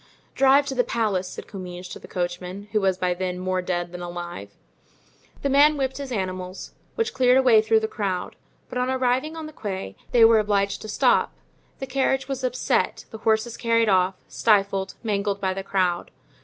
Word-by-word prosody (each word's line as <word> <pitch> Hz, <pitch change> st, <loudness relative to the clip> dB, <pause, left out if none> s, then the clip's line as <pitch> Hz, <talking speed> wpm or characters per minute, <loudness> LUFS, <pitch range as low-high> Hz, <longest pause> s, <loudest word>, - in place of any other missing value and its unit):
"Drive 275 Hz, +1 st, +5 dB
to 280 Hz, -, -3 dB
the 250 Hz, -1 st, +2 dB
palace," 210 Hz, -6 st, -1 dB
said -, -, -8 dB
Comminges 180 Hz, -2 st, -8 dB
to -, -, -8 dB
the -, -, -13 dB
coachman, 180 Hz, +3 st, -4 dB
who 215 Hz, -, +1 dB
was 190 Hz, -1 st, +2 dB
by 180 Hz, -1 st, 0 dB
then 180 Hz, 0 st, -3 dB
more 185 Hz, 0 st, -1 dB
dead 175 Hz, -1 st, -2 dB
than 180 Hz, 0 st, -7 dB
alive. 175 Hz, 0 st, -7 dB, 0.9 s
The 280 Hz, -, +1 dB
man 290 Hz, +2 st, +5 dB
whipped 265 Hz, -1 st, -1 dB
his 275 Hz, -2 st, -6 dB
animals, 185 Hz, -3 st, -4 dB, 0.2 s
which 455 Hz, 0 st, -1 dB
cleared 255 Hz, 0 st, +4 dB
a 265 Hz, -, +4 dB
way 230 Hz, -4 st, +6 dB
through 220 Hz, 0 st, +3 dB
the 220 Hz, -, -1 dB
crowd; 195 Hz, -5 st, -3 dB, 0.3 s
but 250 Hz, -, -4 dB
on 250 Hz, +1 st, 0 dB
arriving 260 Hz, +4 st, 0 dB
on 320 Hz, -, -5 dB
the 310 Hz, -, -9 dB
Quai 190 Hz, -, -5 dB, 0.2 s
they 235 Hz, -2 st, +7 dB
were 225 Hz, -1 st, +6 dB
obliged 200 Hz, -1 st, 0 dB
to -, -, -7 dB
stop; 215 Hz, -, +2 dB, 0.4 s
the 270 Hz, -, -5 dB
carriage 270 Hz, 0 st, 0 dB
was 270 Hz, -1 st, -4 dB
upset, 250 Hz, -1 st, 0 dB
the 220 Hz, -, -8 dB
horses 220 Hz, +2 st, +1 dB
carried 230 Hz, -1 st, +2 dB
off, 185 Hz, -1 st, +3 dB
stifled, 195 Hz, -3 st, +1 dB
mangled 200 Hz, -2 st, -1 dB
by 190 Hz, -1 st, 0 dB
the 195 Hz, -, -4 dB
crowd. 185 Hz, -3 st, 0 dB
210 Hz, 195 wpm, -24 LUFS, 185-250 Hz, 0.9 s, they